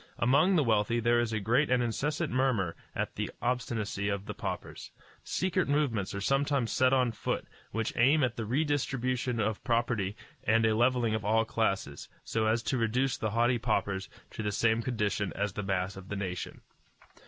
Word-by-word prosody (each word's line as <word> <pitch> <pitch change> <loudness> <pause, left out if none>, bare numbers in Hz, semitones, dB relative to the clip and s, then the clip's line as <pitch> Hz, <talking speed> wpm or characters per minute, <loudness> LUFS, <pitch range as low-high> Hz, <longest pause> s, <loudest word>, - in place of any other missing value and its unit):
Among 145 +10 +4
the 155 - +4
wealthy 115 0 +2
there 120 +1 +3
is 120 -1 0
a 110 - 0
great 120 +8 +2
and 125 -1 +3
incessant 150 +6 -1
murmur 125 -10 +1 0.2
at - - -2
the - - -3
obstinacy 115 -4 -1
of 100 -1 -2
the - - -5
paupers. - - -6 0.3
Secret 185 -5 0
movements 125 -11 0
are 100 - -3
sometimes 135 0 +1
set 130 0 +3
on 130 -3 +3
foot - - -3 0.2
which 115 +1 -2
aim 140 +5 +4
at 120 -2 -1
a - - -1
redistribution 130 -2 0
of 110 -1 -1
property 115 -5 0 0.3
and 115 +1 +3
a 110 - +3
levelling 120 -1 +2
of 110 -1 -1
all 110 +2 +2
classes, 95 -11 -2
so 110 -1 0
as 115 +1 +1
to 130 - 0
reduce 125 +4 +1
the 110 - -2
haughty 120 +3 +2
paupers 100 -4 -1 0.2
to - - -5
the 105 -1 -1
same 115 +2 +2
condition 105 -5 -1
as 100 -1 -1
the 105 - -3
mass 95 -1 -1
of 95 -1 -11
the 100 - -3
nation. 95 -3 -4
115 Hz, 185 wpm, -30 LUFS, 105-130 Hz, 0.3 s, Among